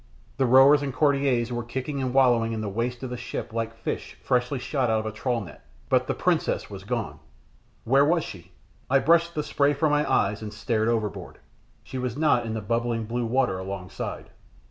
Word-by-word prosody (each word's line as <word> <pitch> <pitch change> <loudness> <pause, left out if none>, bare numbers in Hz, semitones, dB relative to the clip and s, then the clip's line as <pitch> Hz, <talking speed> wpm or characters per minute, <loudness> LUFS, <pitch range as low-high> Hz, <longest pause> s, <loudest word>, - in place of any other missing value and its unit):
The 135 -2 +2
rowers 135 +3 +7
and 140 -1 -2
courtiers 135 -4 +1
were 120 - -2
kicking 130 +4 -4
and 130 -1 -1
wallowing 120 -4 +3
in 110 - -3
the 105 - -3
"waist" 120 +5 -3
of 130 - -5
the 125 - -4
ship 120 -1 -6
like 115 0 -3
fish 115 - -5
newly 125 +2 +1
shot 130 -1 -1
out 110 0 +2
of - - -9
a 110 - -2
trawl 115 +2 -2
net, 95 - -11 0.3
but - - +2
the - - -1
princess - - 0
was 95 -1 -8
gone. 100 -10 -3 0.6
Where 135 +4 +4
was 165 +3 +2
she? 90 -1 -10 0.4
I 135 - +5
brushed 170 +5 +3
the 150 - -1
spray 145 0 +2
from 145 +2 +1
my 150 0 +1
eyes, 105 +2 +1
and 105 -1 -6
stared 110 0 -1
overboard. 110 -4 -2 0.5
She 130 - -6
was 125 0 -3
not 145 -6 +2
in 110 - -3
the 110 - -3
bubbling 115 +1 -1
blue 120 +1 -2
water 125 -6 +1
alongside. 95 -1 -6
120 Hz, 205 wpm, -26 LUFS, 110-135 Hz, 0.6 s, rowers